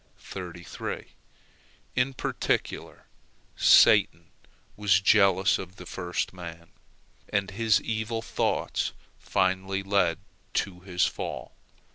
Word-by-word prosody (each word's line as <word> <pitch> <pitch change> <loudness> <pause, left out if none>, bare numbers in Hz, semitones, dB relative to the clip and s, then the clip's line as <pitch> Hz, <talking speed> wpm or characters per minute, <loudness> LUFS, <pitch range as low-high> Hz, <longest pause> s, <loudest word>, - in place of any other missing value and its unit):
In 130 +1 +1
particular, - - -2 0.5
Satan - - +5 0.4
was 100 -2 +3
jealous 100 -1 +4
of 95 0 -8
the 90 - -11
first 90 0 -3
man, 85 -2 -9 0.6
and 100 -1 0
his 110 +1 +3
evil 110 +1 -3
thoughts - - -1 0.3
finally 95 +1 0
led 95 -4 +2 0.4
to 90 -2 -1
his 90 -1 0
fall. - - -5
95 Hz, 90 wpm, -27 LUFS, 90-105 Hz, 0.6 s, Satan